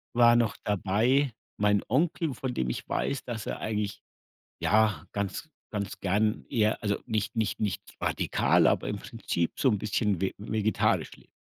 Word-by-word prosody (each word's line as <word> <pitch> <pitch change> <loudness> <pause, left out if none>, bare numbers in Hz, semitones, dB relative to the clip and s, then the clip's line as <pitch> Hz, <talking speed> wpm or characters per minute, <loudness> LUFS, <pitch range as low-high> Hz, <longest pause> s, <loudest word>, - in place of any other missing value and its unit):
War 120 0 +7
noch 115 -3 +1
dabei, 110 +7 +2 0.2
mein 105 -1 +3
Onkel, 155 +3 +1
von 130 0 -4
dem 65 - -1
ich - - -4
weiß, 140 - -1
dass 110 -4 -5
er - - -3
eigentlich 105 -1 -2 0.6
ja 110 -1 +2
ganz 100 - -3 0.2
ganz 105 -2 -4
gern 105 +3 +1
eher 110 -2 +1
also, 100 -1 +1
nicht 110 0 -2
nicht 110 -3 0
nicht 105 -3 -1 0.2
radikal, - - +3
aber - - +1
im - - -2
Prinzip 85 -1 -3
so 130 - +3
'n 105 - +2
bisschen 105 -2 0
ve 95 - 0
vegetarisch 110 +1 0
lebt. - - -18
105 Hz, 165 wpm, -28 LUFS, 100-120 Hz, 0.6 s, War